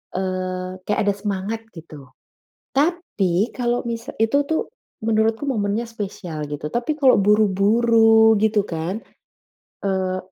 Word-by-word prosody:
eee, 185 Hz, 0 st, -3 dB
kayak 210 Hz, -, 0 dB
ada -, -, +2 dB
semangat 205 Hz, +2 st, -3 dB
gitu. 155 Hz, -5 st, -11 dB, 0.7 s
Tapi 260 Hz, -, 0 dB
kalau 240 Hz, -1 st, -1 dB
misal 230 Hz, -1 st, -5 dB
itu 225 Hz, +5 st, +2 dB
tuh 320 Hz, -, +1 dB, 0.4 s
menurutku 220 Hz, +2 st, +1 dB
momennya 215 Hz, -4 st, -1 dB
spesial 190 Hz, -9 st, -6 dB
gitu, 145 Hz, 0 st, -5 dB
tapi 245 Hz, +6 st, -1 dB
kalau 270 Hz, -4 st, +5 dB
buru-buru 220 Hz, +2 st, +4 dB
gitu 215 Hz, -1 st, +2 dB
kan, 170 Hz, +3 st, -3 dB, 0.9 s
eee, 190 Hz, -1 st, 0 dB
210 Hz, 115 wpm, -22 LUFS, 185-230 Hz, 0.9 s, kalau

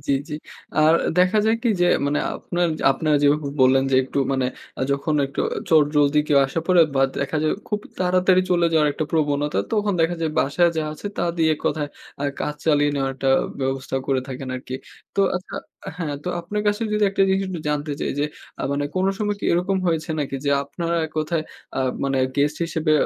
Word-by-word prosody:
জি, 140 Hz, -, +2 dB, 0.2 s
জি। 150 Hz, -, -4 dB, 0.4 s
আর 155 Hz, +1 st, +5 dB, 0.2 s
দেখা 185 Hz, +4 st, +4 dB
যায় 225 Hz, -, +3 dB
কি 240 Hz, -, +2 dB
যে 175 Hz, -, +5 dB, 0.2 s
মানে 145 Hz, +1 st, +1 dB, 0.2 s
আপনার 175 Hz, 0 st, -1 dB, 0.2 s
আপনারা 150 Hz, +2 st, +1 dB
যেভাবে 145 Hz, 0 st, +3 dB
বললেন 135 Hz, +1 st, +5 dB
যে, -, -, +2 dB
একটু 130 Hz, -, -4 dB
মানে 130 Hz, -1 st, +1 dB, 0.3 s
আ -, -, -5 dB
যখন 140 Hz, +3 st, -1 dB
একটু 135 Hz, -, -4 dB, 0.3 s
চট 155 Hz, -3 st, +6 dB
জলদি 145 Hz, 0 st, +4 dB
কেউ 145 Hz, -, +5 dB
আসা 165 Hz, +5 st, -2 dB
পরে 180 Hz, -2 st, +5 dB
বা, 135 Hz, -, +3 dB, 0.2 s
দেখা 140 Hz, +3 st, -1 dB
যায় 155 Hz, -, +2 dB, 0.2 s
খুব 210 Hz, -1 st, -1 dB, 0.2 s
তাড়াতাড়ি 185 Hz, 0 st, +3 dB
চলে 175 Hz, -1 st, +3 dB
যাওয়ার 155 Hz, -2 st, +4 dB
একটা 155 Hz, -, -2 dB
প্রবণতা, 150 Hz, -2 st, +1 dB
তখন 210 Hz, -1 st, +1 dB
দেখা 165 Hz, +2 st, +2 dB
যায় 160 Hz, -1 st, 0 dB
বাসায় 170 Hz, +5 st, +3 dB
যা 160 Hz, -, +1 dB
আছে, 155 Hz, -, -8 dB
তা -, -, -1 dB
দিয়ে 160 Hz, -1 st, +3 dB
এক -, -, -15 dB
কথায় 150 Hz, -1 st, -1 dB, 0.3 s
আ -, -, -2 dB, 0.2 s
কাজ 150 Hz, -, -2 dB
চালিয়ে 145 Hz, -2 st, +4 dB
নেওয়ার 135 Hz, -1 st, 0 dB
একটা 135 Hz, 0 st, -1 dB, 0.3 s
ব্যবস্থা 135 Hz, 0 st, -2 dB
করে 135 Hz, -1 st, +1 dB
থাকেন 130 Hz, 0 st, -6 dB
আরকি। 130 Hz, 0 st, -7 dB, 0.4 s
তো -, -, +3 dB, 0.2 s
আচ্ছা 180 Hz, -, -7 dB, 0.4 s
হ্যাঁ, 150 Hz, -4 st, -2 dB
তো -, -, -2 dB
আপনার 205 Hz, +5 st, -3 dB
কাছে 205 Hz, +2 st, +1 dB
যদি 210 Hz, 0 st, +2 dB
একটা 195 Hz, -, +2 dB
জিনিস 190 Hz, +1 st, +2 dB
একটু 175 Hz, -4 st, -4 dB
জানতে 150 Hz, 0 st, -1 dB
চাই -, -, -1 dB
যে, 145 Hz, -, +2 dB, 0.4 s
আ -, -, -2 dB
মানে 145 Hz, 0 st, -1 dB
কোন 185 Hz, -, +2 dB
সময় 205 Hz, -1 st, -1 dB
কি -, -, -5 dB
এরকম 180 Hz, +3 st, +1 dB
হয়েছে 165 Hz, 0 st, 0 dB
নাকি 135 Hz, -1 st, -2 dB
যে 140 Hz, -, +1 dB
আপনার 170 Hz, +4 st, -4 dB, 0.2 s
এক 155 Hz, -, -16 dB
কথায় 155 Hz, +1 st, 0 dB, 0.4 s
আ -, -, +1 dB, 0.2 s
মানে 135 Hz, -1 st, 0 dB, 0.2 s
গেস্ট 145 Hz, +2 st, +2 dB
হিসেবে 160 Hz, -1 st, 0 dB
155 Hz, 210 wpm, -22 LUFS, 140-175 Hz, 0.4 s, চট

